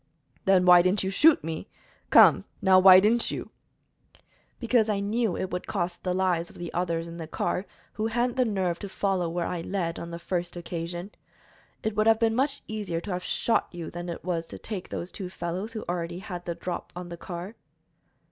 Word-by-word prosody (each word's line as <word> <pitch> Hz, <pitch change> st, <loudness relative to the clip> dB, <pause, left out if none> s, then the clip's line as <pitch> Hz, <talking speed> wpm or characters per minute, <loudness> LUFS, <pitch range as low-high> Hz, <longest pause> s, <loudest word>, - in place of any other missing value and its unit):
"Then 190 Hz, -1 st, +4 dB
why 180 Hz, -1 st, +8 dB
didn't 185 Hz, +3 st, +1 dB
you 190 Hz, -, -1 dB
shoot 305 Hz, +10 st, +5 dB
me? 160 Hz, +5 st, -5 dB, 0.4 s
Come, -, -, +7 dB
now, 190 Hz, -2 st, +6 dB
why 185 Hz, 0 st, +9 dB
didn't 225 Hz, +4 st, +3 dB
you?" -, -, -5 dB, 1.1 s
"Because 235 Hz, -2 st, +2 dB
I 205 Hz, -2 st, +1 dB
knew 210 Hz, 0 st, 0 dB
it 190 Hz, -, -3 dB
would 180 Hz, -, -4 dB
cost 175 Hz, -3 st, -2 dB
the 180 Hz, -1 st, -1 dB
lives 180 Hz, -3 st, +1 dB
of -, -, -15 dB
the 175 Hz, -1 st, -6 dB
others 170 Hz, -1 st, -1 dB
in 170 Hz, 0 st, -8 dB
the 165 Hz, -2 st, -6 dB
car, 180 Hz, +4 st, -2 dB, 0.3 s
who 220 Hz, +1 st, -1 dB
hadn't 240 Hz, +2 st, 0 dB
the 255 Hz, -, +3 dB
nerve 190 Hz, -6 st, -1 dB
to 200 Hz, -, -6 dB
follow 190 Hz, -3 st, 0 dB
where 170 Hz, 0 st, -2 dB
I 175 Hz, -, -3 dB
led, 170 Hz, -2 st, -2 dB
on 170 Hz, -, -6 dB
the 170 Hz, -, -6 dB
first 175 Hz, 0 st, -3 dB
occasion. 175 Hz, +2 st, -5 dB, 0.7 s
It 220 Hz, -1 st, -1 dB
would 215 Hz, +1 st, +2 dB
have 225 Hz, 0 st, +6 dB
been 225 Hz, -1 st, +2 dB
much 275 Hz, +4 st, 0 dB
easier 205 Hz, -6 st, -3 dB
to 195 Hz, +4 st, -6 dB
have 180 Hz, 0 st, -3 dB
shot 230 Hz, +4 st, +1 dB
you 170 Hz, -2 st, -7 dB
than 175 Hz, +1 st, -6 dB
it 170 Hz, -, -6 dB
was 170 Hz, -2 st, -2 dB
to -, -, -9 dB
take 205 Hz, -5 st, -6 dB
those 175 Hz, -, -5 dB
two 190 Hz, -4 st, -6 dB
fellows 185 Hz, +5 st, -4 dB
who 220 Hz, -, -5 dB
already 175 Hz, -1 st, -3 dB
had 180 Hz, -2 st, -7 dB
the 170 Hz, -, -3 dB
drop 180 Hz, +1 st, -5 dB
on 180 Hz, 0 st, -7 dB
the 170 Hz, -, -6 dB
car." 175 Hz, +4 st, -7 dB
180 Hz, 210 wpm, -27 LUFS, 175-210 Hz, 1.1 s, why